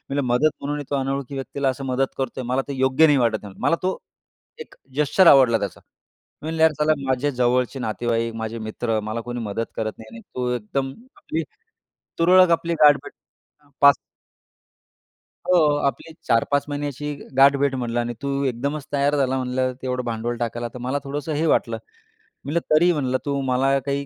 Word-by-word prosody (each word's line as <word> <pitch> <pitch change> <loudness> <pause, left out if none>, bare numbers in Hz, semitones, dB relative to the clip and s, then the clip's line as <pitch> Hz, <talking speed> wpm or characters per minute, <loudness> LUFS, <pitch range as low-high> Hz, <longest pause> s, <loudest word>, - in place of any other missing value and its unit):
म्हणलं, 145 - +1
"मदत 150 +5 +4
म्हणूनही 145 +1 -3
तो 145 - 0
अनोळखी 135 0 -2
व्यक्तीला 135 0 -2
असं 135 +1 -4
मदत 130 +1 -1
करतोय 130 -1 -3
मला 125 +2 0
ते 140 - -4
योग्य 130 +4 +4
नाही 145 -3 +4
वाटत 115 -4 0
आहे." 100 - -9
मला 165 - +2
तो 185 +1 0 0.6
एक - - -10 0.2
जेस्चर 150 +5 +4
आवडला 130 -6 +7
त्याचा. 100 - -5 0.6
मी - - -9
म्हणले, 160 0 -2
"यार 160 - +6
साला 155 +1 +3
माझे 130 +2 0
जवळचे 125 +1 0
नातेवाईक, 115 0 -1
माझे 115 0 -4
मित्र 110 +1 -2
मला 110 +2 -4
कोणी 120 +1 -5
मदत 115 +1 -3
करत 110 -1 -2
नाही 110 0 -12
आणि 115 - -10
तू 125 -1 -1
एकदम 135 +4 -3 0.3
आपली 165 +1 -3 0.8
तुरळक, 180 +1 +6
आपली 170 0 +1
गाठ 145 -1 +8
भेट - - -10 0.5
हां. 145 - -27
5 140 0 +8 1.5
"हो, 180 -3 +5 0.2
आपली 140 +5 -5
4-5 140 +5 +2
महिन्याची 145 0 -4 0.2
गाठभेट" 140 0 +5
म्हणलं 120 -2 -2
"आणि 120 0 -2
तू 140 0 -1
एकदमच 140 +4 -2
तयार 145 +1 +2
झाला 135 -1 +1
म्हणलं 130 0 -1
तेवढं 125 -1 -2
भांडवल 115 +1 -2
टाकायला, 120 0 -3
तर - - -7
मला 130 +4 -2
थोडंसं 145 +2 -4
हे 155 +2 0
वाटलं" 115 -7 +1 0.7
म्हटलं. 155 +4 0
तरी 175 +3 +5
म्हणलं, 130 -5 0
"तू 140 -1 -1
मला 135 +2 +2
काही 140 0 -2
135 Hz, 175 wpm, -23 LUFS, 120-145 Hz, 1.5 s, गाठ